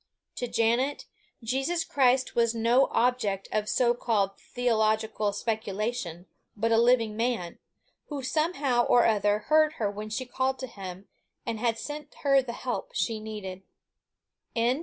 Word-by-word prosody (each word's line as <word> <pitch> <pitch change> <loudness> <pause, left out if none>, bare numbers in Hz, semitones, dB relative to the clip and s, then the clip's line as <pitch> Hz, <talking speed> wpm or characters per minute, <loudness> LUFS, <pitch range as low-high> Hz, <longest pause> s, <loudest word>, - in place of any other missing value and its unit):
To 245 - -2
Janet, 240 +5 +1 0.4
Jesus 270 +9 0
Christ 260 -4 +2
was 235 -1 +2
no 235 +4 +4
object 230 -5 0
of 215 0 -1
so 240 -1 +3
called 205 -5 0
theological 220 -3 0
speculation, 210 -3 -3 0.3
but 225 +2 +1
a 225 - +5
living 235 -3 +3
man, 225 -7 -2 0.5
who 285 -3 -5
somehow 275 -3 +1
or 240 - +5
other 210 -2 +3
heard 310 0 +5
her 210 -7 -1
when 210 +1 -6
she 240 +4 -3
called 260 +1 -1
to 260 - -5
him, 195 -4 -9 0.4
and 225 -1 -3 0.2
sent 295 +3 -7
her 275 -1 +5
the 250 -2 -6
help 250 0 -4
she 225 -2 0
needed. 210 -4 -7
235 Hz, 140 wpm, -28 LUFS, 215-260 Hz, 0.5 s, a